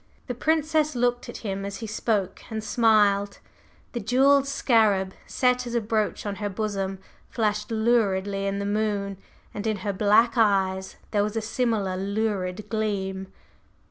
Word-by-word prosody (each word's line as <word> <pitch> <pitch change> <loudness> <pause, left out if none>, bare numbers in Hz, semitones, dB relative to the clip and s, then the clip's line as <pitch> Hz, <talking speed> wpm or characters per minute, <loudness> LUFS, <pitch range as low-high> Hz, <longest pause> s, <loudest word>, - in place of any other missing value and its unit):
The 250 - -3
Princess 310 +2 +1
looked 245 0 0
at - - -6
him 195 -1 -3
as 200 0 -5
he 225 - -6
spoke 210 -3 -1
and 220 -1 -4
smiled. 210 -3 +3 0.5
The 240 - -3
jewelled 270 +5 +4
scarab, 215 -8 +2
set 250 -1 +1
as 240 - -4
a - - +4
brooch 215 -1 -1
on 200 -1 -3
her 205 0 -2
bosom, 195 -1 -2 0.3
flashed 210 -3 -1
luridly 205 -4 +1
in 195 0 -1
the 200 - -3
moon, 205 -2 -1 0.3
and 210 +2 -4
in 215 -1 0
her 200 - 0
black 210 +4 +4
eyes 190 -3 +2 0.2
there 205 - +2
was 210 +1 -2
a - - +1
similar 220 -4 -1
lurid 200 -1 -2
gleam. 195 -3 -2
210 Hz, 155 wpm, -25 LUFS, 200-230 Hz, 0.5 s, jewelled